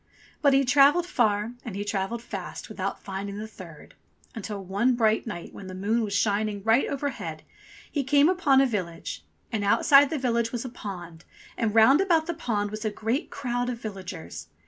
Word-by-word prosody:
But 280 -3 +5
he 270 0 +4
travelled 285 +6 +5
far, 220 - +1
and 220 -5 -6
he 205 +1 -3
travelled 205 +3 -2
fast - - -7
without - - -4
finding 200 +1 -5
the 215 - -5
third, 175 -8 -13 0.4
until 210 -2 -6
one 210 +7 +1
bright 220 -1 +2
night 175 -6 -6
when 195 - -9
the 185 - -7
moon 210 +5 0
was 210 -2 -3
shining 205 0 0
right 225 +4 +3
overhead 280 0 -4 0.5
he 285 - -1
came 285 +3 +4
upon 335 -7 +4
a - - +5
village. 185 -9 -4 0.3
And 220 -3 -1
outside 275 +7 +5
the 315 - -2
village 235 -3 0
was 240 0 -4
a - - -4
pond, 175 -8 -8 0.3
and 225 -2 -1
round 260 +9 +7
about 335 -5 +3
the 340 - -2
pond 210 -10 -2
was 215 +1 -5
a 215 - 0
great 225 +6 -2
crowd 245 -2 -2
of 245 - -3
villagers. 185 - -7
225 Hz, 190 wpm, -26 LUFS, 200-265 Hz, 0.5 s, round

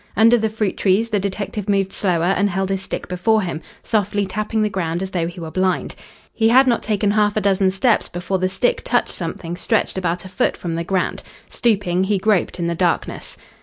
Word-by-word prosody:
Under 230 +2 +6
the 220 -2 +1
fruit 215 -2 -2
trees 205 +4 +2
the 210 - +2
detective 200 +1 -4
moved 195 -1 +1
slower 180 -1 +1
and 200 +2 +2
held 190 +1 -1
his 195 -1 -1
stick - - -5
before 210 +4 +1
him, 170 -3 -4 0.2
softly 205 -2 0
tapping 215 +3 -1
the - - +2
ground 175 -2 -2
as 190 - -5
though 170 -2 -1
he 175 +1 -8
were 160 -2 -6
blind. 185 0 0 0.4
He 225 -1 +2
had 260 +3 +6
not 245 -3 +2
taken 205 -1 0
half 210 0 +2
a - - +2
dozen 195 -1 +2
steps 215 +5 +1
before 180 +2 -2
the 185 0 +1
stick 195 +6 0
touched 245 - +1
something 165 0 -5
stretched 210 0 0
about 175 0 -2
a - - -8
foot 185 - 0
from 170 -2 -4
the 165 +1 -2
ground. 185 +1 -1 0.3
Stooping, 195 -6 +1
he 205 +1 +1
groped 200 -2 +1
in 170 - -2
the 170 - 0
darkness. 175 0 -1
195 Hz, 215 wpm, -20 LUFS, 180-215 Hz, 0.4 s, Under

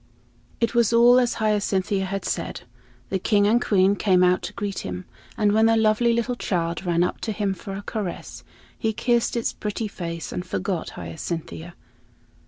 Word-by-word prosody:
It 230 +1 +1
was 235 -2 +3
all 240 +2 +6
as 245 -1 +1
Hyacinthia 200 -2 0
had 195 +1 -4
said. - - -3 0.5
The 190 - 0
King 205 +2 +3
and 230 +4 +3
Queen 195 -1 +3
came 185 -3 +3
out 180 0 +3
to - - -6
greet 200 -2 -3
him, 90 0 -6 0.3
and 210 -1 +3
when 220 +2 +4
the 225 0 +4
lovely 220 +2 +3
little 235 +1 0
child 170 -4 -2
ran 170 0 +3
up 180 - -2
to 220 - -2
him 205 -2 -1
for 195 +1 -8
a 200 - -6
caress, 205 -5 -5 0.3
he 220 0 -1
kissed 240 +1 +1
its 230 - -1
pretty 210 +1 -3
face 170 -4 -6
and 180 - -3
forgot 185 -1 -3
Hyacinthia. 165 - -6
205 Hz, 180 wpm, -24 LUFS, 180-225 Hz, 0.5 s, all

